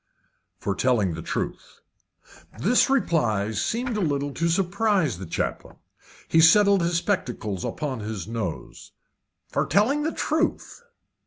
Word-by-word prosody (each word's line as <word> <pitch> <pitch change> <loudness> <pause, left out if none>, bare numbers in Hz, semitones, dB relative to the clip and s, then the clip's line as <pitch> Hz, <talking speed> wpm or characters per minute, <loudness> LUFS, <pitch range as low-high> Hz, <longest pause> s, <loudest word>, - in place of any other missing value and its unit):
"For 100 - -2
telling 105 -4 +1
the 80 - -6
truth." - - -5 0.8
This 235 - +3
reply 145 - +1
seemed 230 - -2
a - - -1
little 145 -4 -1
to 165 +3 0
surprise 180 - +1
the 95 - -7
chaplain. - - -4 0.5
He 165 - +4
settled 200 +4 +6
his 170 0 +1
spectacles 170 - -2
upon 140 -5 -3
his 105 -4 -5
nose. 110 -7 -6 0.6
"For - - 0
telling 255 +9 +2
the 315 +2 -1
truth!" 315 +10 -2
160 Hz, 130 wpm, -25 LUFS, -, 0.8 s, settled